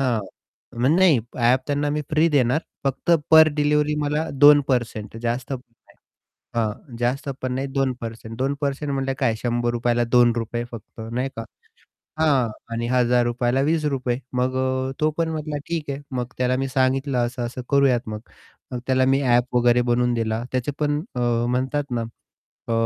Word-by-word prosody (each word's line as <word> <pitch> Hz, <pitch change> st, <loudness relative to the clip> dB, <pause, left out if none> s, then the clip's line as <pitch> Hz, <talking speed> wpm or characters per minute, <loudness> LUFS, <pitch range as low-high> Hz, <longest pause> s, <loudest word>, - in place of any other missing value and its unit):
हां, 125 Hz, -5 st, +1 dB, 0.6 s
मग 130 Hz, -, +3 dB
नाही 175 Hz, -9 st, +5 dB, 0.2 s
ॲप 125 Hz, +2 st, +4 dB
त्यांना 145 Hz, 0 st, 0 dB
मी 150 Hz, -, -1 dB
फ्री 155 Hz, +2 st, +3 dB
देणार. 140 Hz, 0 st, +2 dB, 0.2 s
फक्त 135 Hz, +5 st, -1 dB, 0.2 s
पर 160 Hz, 0 st, +8 dB
डिलिव्हरी 150 Hz, 0 st, +2 dB
मला 150 Hz, +2 st, -1 dB, 0.2 s
2% 125 Hz, -7 st, +3 dB
जास्त 120 Hz, +3 st, -2 dB
पण 130 Hz, -, -2 dB, 0.3 s
नाही, -, -, -23 dB, 0.6 s
हां, 115 Hz, +2 st, -3 dB
जास्त 125 Hz, +4 st, -1 dB
पण 130 Hz, -1 st, -2 dB
नाही 135 Hz, +1 st, -2 dB
2%, 115 Hz, -4 st, -3 dB
2% 140 Hz, +2 st, -2 dB
म्हटले 135 Hz, -1 st, -1 dB
काय 130 Hz, -5 st, +1 dB
₹100 120 Hz, 0 st, 0 dB
ला 120 Hz, 0 st, +2 dB
₹2 120 Hz, -1 st, +2 dB
फक्त 115 Hz, 0 st, -10 dB
नाही 125 Hz, +3 st, -1 dB
का. 115 Hz, -, -4 dB, 0.8 s
हां. 140 Hz, -6 st, +3 dB, 0.2 s
आणि 115 Hz, +1 st, -2 dB
₹1000 120 Hz, -1 st, +2 dB
ला 135 Hz, -, +2 dB
₹20 135 Hz, -6 st, 0 dB, 0.2 s
मग 130 Hz, +1 st, 0 dB
अ, 130 Hz, 0 st, -1 dB
तो 155 Hz, 0 st, +3 dB
पण 165 Hz, -1 st, +1 dB
म्हटला, 155 Hz, -1 st, -4 dB
"ठीक 160 Hz, -4 st, -3 dB
आहे." 140 Hz, +1 st, -4 dB, 0.2 s
मग 125 Hz, -1 st, -2 dB
त्याला 125 Hz, 0 st, +1 dB
मी 135 Hz, +1 st, -2 dB
सांगितलं 130 Hz, 0 st, +1 dB
असं-असं 120 Hz, 0 st, -5 dB
करूयात 135 Hz, -5 st, +3 dB
मग. 105 Hz, 0 st, -5 dB, 0.5 s
मग 125 Hz, -, -3 dB
त्याला 130 Hz, 0 st, +3 dB
मी 135 Hz, +1 st, +3 dB
ॲप 125 Hz, 0 st, +2 dB
वगैरे 120 Hz, 0 st, +4 dB
बनवून 120 Hz, 0 st, +2 dB
दिला. 115 Hz, 0 st, -1 dB
त्याचे 130 Hz, +3 st, -1 dB
पण 145 Hz, 0 st, 0 dB, 0.2 s
अ, -, -, -1 dB, 0.3 s
म्हणतात 130 Hz, +3 st, -1 dB
ना. 120 Hz, -1 st, -1 dB, 0.7 s
अ, -, -, 0 dB
130 Hz, 165 wpm, -23 LUFS, 120-140 Hz, 0.8 s, पर